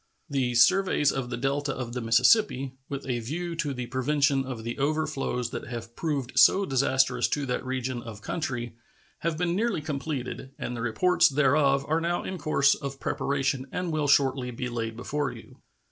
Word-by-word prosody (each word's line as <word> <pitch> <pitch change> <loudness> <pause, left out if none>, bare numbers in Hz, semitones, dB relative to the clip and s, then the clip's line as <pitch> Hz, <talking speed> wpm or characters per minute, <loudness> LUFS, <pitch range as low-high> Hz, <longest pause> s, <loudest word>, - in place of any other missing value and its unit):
The 130 -3 0
surveys 185 +1 +4
of 130 -2 -3
the 120 - -3
Delta 140 +2 -1
of 120 -2 -5
the 125 - -3
Mississippi, 130 - +3 0.2
with 140 -1 -5
a 125 -2 -1
view 165 +9 -4
to 150 -3 -1
the 125 -2 -4
prevention 135 +2 +1
of 125 -4 -6
the 120 +4 -5
overflows 140 -5 -1
that - - -5
have 120 -1 -7
proved 140 -6 -1
so 200 +1 +6
disastrous 130 -3 +2
to 145 -1 -1
that 125 -1 -2
region 130 -1 -3
of 110 -2 -10
country, 120 -7 -3 0.5
have 165 -1 -1
been 175 0 0
nearly 225 -2 0
completed, 140 -3 -4
and 125 - -4
the 115 - -5
reports 150 +11 +3
thereof 140 0 +3
are 160 +2 +1
now 170 +1 -1
in 190 -1 -5
course 140 -2 +3
of 135 0 -6
preparation 135 -1 -1
and 180 -1 -2
will 155 -2 0
shortly 135 -2 +3
be 125 +1 -4
laid 115 -1 -4
before 145 +4 -2
you. - - -13
135 Hz, 180 wpm, -27 LUFS, 125-150 Hz, 0.5 s, so